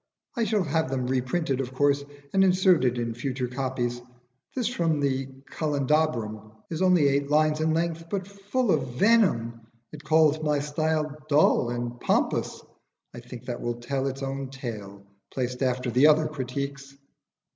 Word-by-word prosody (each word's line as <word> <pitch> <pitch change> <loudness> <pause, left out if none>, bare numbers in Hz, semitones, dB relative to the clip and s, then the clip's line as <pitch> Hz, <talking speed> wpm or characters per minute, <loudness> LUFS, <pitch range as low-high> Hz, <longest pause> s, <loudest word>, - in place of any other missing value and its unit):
I 235 -2 +1
shall 210 -2 +1
have 160 -2 0
them 130 -1 -1
reprinted, 130 +2 0
of 130 0 -6
course, 145 +1 +2 0.3
and 195 0 +5
inserted 180 -9 +3
in 115 -1 -2
future 125 +1 -3
copies. 125 -1 -3 0.5
This 250 -5 0
from 165 -10 0
the 135 -2 0 0.2
'Candelabrum' 135 -8 -1 0.2
is 160 - -3
only 180 -6 +4
eight 140 0 +1
lines 155 0 +3
in 160 0 +2
length, 165 0 -1
but 190 -1 -3
full 200 +4 -1
of 130 -5 -1
venom. 125 - +3 0.3
It 150 -1 -10
calls 155 -1 +3
my 150 -1 +1
style 155 +1 -1
dull 145 -4 +4
and 120 0 -4
pompous. - - 0 0.5
I - - -8
think 120 0 -11
that 120 -1 -5
will 120 0 -2
tell 135 +3 -2
its 135 0 -4
own 135 0 -4
tale, 105 -7 -7 0.3
placed 125 0 -3
after 125 -1 0
the 130 +6 +5
other 155 0 +5
critiques." 140 -1 -5
140 Hz, 155 wpm, -26 LUFS, 125-160 Hz, 0.5 s, and